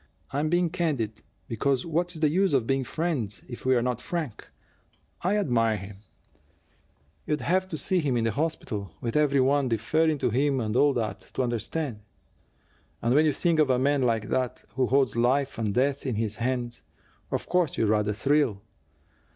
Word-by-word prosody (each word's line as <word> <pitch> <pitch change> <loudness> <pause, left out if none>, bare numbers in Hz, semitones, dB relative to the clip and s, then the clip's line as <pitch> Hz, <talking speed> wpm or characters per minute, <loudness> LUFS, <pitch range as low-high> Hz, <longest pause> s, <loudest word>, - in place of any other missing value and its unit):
I'm 145 +3 0
being 175 0 +2
candid, 130 - -1 0.3
because 130 +3 0
what's 170 +2 -1
the 155 -1 +2
use 190 -2 +2
of 125 -4 +2
being 135 +1 +1
friends 130 - -2
if 125 0 -7
we're 125 -2 +3
not 125 -1 -1
frank? 160 -10 -4 0.7
I 190 +4 +1
admire 115 - +2
him 100 0 -9 1.3
you'd 150 0 0
have 185 +2 +1
to 160 - -4
see 185 +4 +1
him 140 -6 0
in 115 - +1
the 115 - +1
hospital, 125 - -3
with 115 -1 -3
every 145 -2 +3
one 135 0 +2
deferring 155 +8 +1
to 125 - 0
him 135 +3 +1
and 110 -2 -2
all 145 +2 +4
that, 110 -5 -2 0.2
to 130 - +1
understand. 120 +2 -2 1.0
And 120 +1 +2
when 150 +3 +5
you - - +4
think 165 +3 +1
of 150 -3 +4
a 130 - +3
man 140 +2 +2
like 115 -4 0
that, 130 -2 -1
who 130 -1 +1
holds 135 -1 +2
life 130 +2 +1
and 110 -2 0
death 135 +5 0
in 125 - -1
his 105 -1 -1
hands, 120 0 -2 0.5
of - - -2
course 180 -5 +1
you - - +2
rather 105 0 +2
thrill. 120 -2 +1
130 Hz, 180 wpm, -27 LUFS, 115-150 Hz, 1.3 s, when